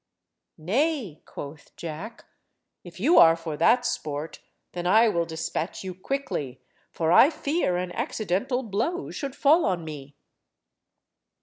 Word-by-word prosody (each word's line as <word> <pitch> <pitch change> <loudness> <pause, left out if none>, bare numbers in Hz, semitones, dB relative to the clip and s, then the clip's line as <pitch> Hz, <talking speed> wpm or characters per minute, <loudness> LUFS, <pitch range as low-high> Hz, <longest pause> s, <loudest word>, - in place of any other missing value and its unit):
"Nay," 225 - -1
quoth 145 +1 -10
Jack, 170 +8 -8 0.6
"if 175 0 -12
you 300 - +5
are 165 0 +8
for 165 -2 -5
that 245 +10 +4
sport, 150 -6 -4 0.3
then 175 0 -4
I 220 +5 +6
will 170 -4 0
despatch 160 +2 -4
you 185 -1 -5
quickly, 180 - -4 0.3
for 165 -1 -1
I 265 - +8
fear 305 - -1
an 180 0 -3
accidental 235 - -2
blow 235 - -2
should 280 -3 -5
fall 310 +4 +4
on 180 -4 -1
me." 145 -2 -9
185 Hz, 130 wpm, -26 LUFS, 160-255 Hz, 0.6 s, are